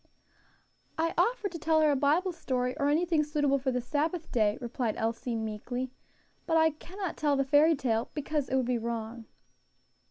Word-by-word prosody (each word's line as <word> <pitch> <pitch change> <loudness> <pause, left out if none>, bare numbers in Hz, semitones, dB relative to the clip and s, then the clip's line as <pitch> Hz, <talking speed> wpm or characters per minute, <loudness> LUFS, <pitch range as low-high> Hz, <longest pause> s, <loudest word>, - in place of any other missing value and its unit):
"I 330 +1 0
offered 460 -4 +1
to 335 - -6
tell 315 +1 +2
her 305 -1 +4
a - - +2
Bible 300 +7 +2
story, 255 -7 -2
or 285 0 +2
anything 325 +1 +2
suitable 290 -2 +1
for 265 0 -1
the 250 0 -1
Sabbath 310 +6 -2
day," 215 -1 +2
replied 240 -2 -2
Elsie, 230 +1 -2
meekly, 225 +4 -4 0.6
"but 325 -2 +3
I 320 0 +5
cannot 360 +4 -6
tell 295 -2 +2
the 275 0 +1
fairy 300 +4 +5
tale, 235 -5 -1
because 295 -2 -2
it 265 - 0
would 260 -2 +2
be 245 -1 0
wrong." 230 0 -4
280 Hz, 180 wpm, -29 LUFS, 245-320 Hz, 0.6 s, I